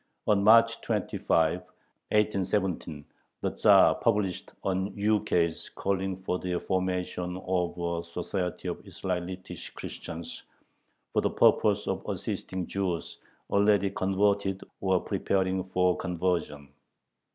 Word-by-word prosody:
On 100 -2 +3
March 115 +2 +6
25, 90 -6 +1 0.5
1817, 95 -7 0 0.4
the - - 0
Tzar - - +6
published 100 -5 0
an 95 +1 -1
ukase 100 -6 +1
calling 95 -1 -1
for 90 -1 -3
the 90 -1 -2
formation 90 -1 -2
of 90 -2 0
a 85 -1 -2
"Society 90 +1 -4
of - - -4
Israelitish 90 0 -5
Christians," 80 0 -7 0.7
for - - +3
the - - +1
purpose - - +3
of - - -2
assisting 95 -1 -3
Jews 90 -3 -3 0.3
already 100 -1 +3
converted 95 0 +1 0.2
or 95 -1 +2
preparing 95 -1 0
for 90 -1 +2
conversion. 85 -6 -2
95 Hz, 105 wpm, -28 LUFS, 90-100 Hz, 0.7 s, March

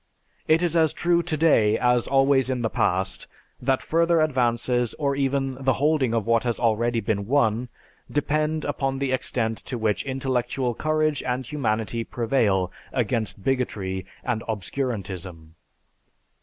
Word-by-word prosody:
It 160 +2 +4
is 170 -1 0
as 160 -2 +3
true 170 +1 +2
today 155 -10 +3
as 125 -1 +2
always 135 -1 +3
in 125 -2 -1
the 110 - 0
past 95 +1 0 0.3
that 130 +1 +1
further 170 +1 +2
advances 125 -4 +1
or 140 -2 0
even 135 -1 -1
the 130 0 +3
holding 145 -2 +1
of 115 - 0
what 115 0 +2
has 120 -2 -1
already 115 0 +1
been 100 -2 -2
won, 120 -2 +1 0.4
depend 155 +1 0
upon 135 -2 -1
the 135 -1 -1
extent 115 -3 -1
to 125 - -6
which 110 -2 0
intellectual 130 -2 -1
courage 155 +2 0
and 125 +1 -2
humanity 115 -4 -1
prevail 110 -7 0 0.2
against 110 -5 -1
bigotry 100 -8 -2 0.2
and 120 -3 -1
obscurantism." 95 - -4
125 Hz, 140 wpm, -24 LUFS, 110-140 Hz, 0.4 s, It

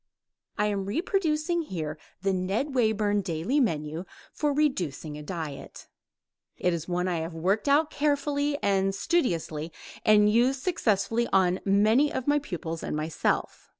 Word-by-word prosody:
I 210 - +2
am 200 -2 -1
reproducing 335 - 0
here 160 - -4 0.3
the 195 0 +2
Ned 195 +10 -1
Wayburn 215 -4 +2
daily 185 - -1
menu 160 - -1 0.3
for 300 - 0
a - - +1
reducing 165 - -1
diet. 155 -4 -7 0.7
It 180 - +1
is 170 -1 -4
one 180 0 -1
I 175 -2 0
have 165 +1 -5
worked 195 - 0
out 295 +2 +3
carefully 285 0 0
and 195 -1 +2
studiously 170 - -1 0.3
and 210 -1 +6
used 250 +5 +2
successfully 235 - +1
on 185 -1 +3
many 215 +9 +4
of 260 - -3
my 290 0 +3
pupils 165 - -5
and - - -3
myself. 155 +1 -2
205 Hz, 145 wpm, -27 LUFS, 170-280 Hz, 0.7 s, and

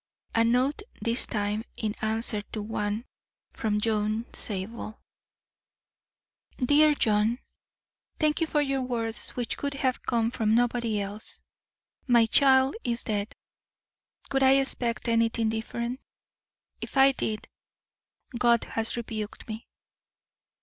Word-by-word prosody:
A 230 - +4
note 250 - +2 0.2
this 230 +1 +4
time 210 0 -1
in 215 -2 -2
answer 220 0 -1
to 215 - -3
one 210 +1 -2 0.5
from 210 -1 -1
John 215 +1 0
Zabel: 215 +1 -4 1.6
DEAR 295 +3 +4
JOHN: 215 -1 +2 0.8
Thank 305 +1 +2
you 325 - +2
for 295 -1 +1 0.2
words 230 -3 -2
which 240 -2 -2
could 280 0 -3
have 260 -2 0
come 230 -2 0
from 220 -3 +1
nobody 235 -2 +1
else. 205 +2 -6 0.6
My 235 -2 +6
child 265 +2 +4
is 235 0 -1
dead. 205 0 -3 1.0
Could 270 - +1
I 265 0 +6
expect 255 -3 +1
anything 230 -1 +2
different? 235 +3 -3 0.8
If - - -5
I 270 0 +7
did, 220 -5 -3 0.9
God 235 -1 +4
has 225 +1 -3
rebuked 220 -2 -5
me. 220 +2 -7
230 Hz, 115 wpm, -27 LUFS, 220-255 Hz, 1.6 s, I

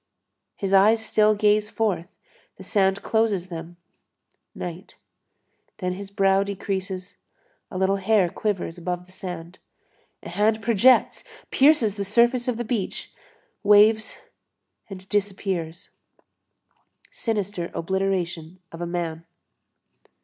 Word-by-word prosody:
His 195 -1 -3
eyes 220 +3 +5
still 215 0 +3
gaze 210 0 +2
forth, 205 -6 -1 0.5
the - - -12
sand 195 -1 +1
closes 210 -5 0
them, 170 0 -8 0.8
night. 175 +1 -7 0.8
Then 180 0 -2
his 195 +1 -8
brow 195 -1 +3
decreases, 190 -2 -4 0.5
a - - -6
little 190 +1 +2
hair 195 -1 +3
quivers 185 -4 -3
above 180 +1 -4
the 185 - -20
sand; 180 -2 -8 0.6
a - - -7
hand 220 +1 +1
projects, 235 +3 +4 0.3
pierces 265 -8 +4
the 200 - -1
surface 235 +4 +2
of 245 -3 0
the 240 - -2
beach, 220 -4 -3 0.5
waves 215 +1 +4 0.7
and 190 -1 -10
disappears. 190 -4 -3 1.2
Sinister 205 -6 -3
obliteration 180 -2 -2
of 165 - -9
a 175 - -2
man. 165 -2 -4
195 Hz, 115 wpm, -24 LUFS, 180-215 Hz, 1.2 s, eyes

